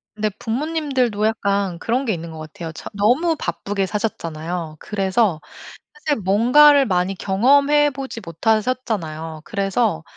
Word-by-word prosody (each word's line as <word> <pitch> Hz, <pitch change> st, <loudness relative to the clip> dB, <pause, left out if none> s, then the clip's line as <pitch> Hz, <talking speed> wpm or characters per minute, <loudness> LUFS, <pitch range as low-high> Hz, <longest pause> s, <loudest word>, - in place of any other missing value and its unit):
근데 215 Hz, 0 st, 0 dB
부모님들도 255 Hz, -4 st, -1 dB
약간 200 Hz, -4 st, -1 dB
그런 245 Hz, +7 st, -1 dB
게 220 Hz, -, +1 dB
있는 170 Hz, -1 st, -6 dB
것 160 Hz, -, -9 dB
같아요. 155 Hz, +1 st, -7 dB
저 160 Hz, -, -9 dB
너무 250 Hz, +12 st, +2 dB
바쁘게 200 Hz, -7 st, -2 dB
사셨잖아요. 170 Hz, -5 st, -4 dB
그래서 195 Hz, -3 st, 0 dB, 0.5 s
사실 305 Hz, -, -2 dB
뭔가를 255 Hz, +9 st, +6 dB
많이 185 Hz, -2 st, 0 dB
경험해 280 Hz, +10 st, +3 dB
보지 265 Hz, -3 st, -6 dB
못하셨잖아요. 170 Hz, -5 st, -2 dB
그래서 200 Hz, -3 st, 0 dB
210 Hz, 315 characters per minute, -21 LUFS, 180-255 Hz, 0.5 s, 뭔가를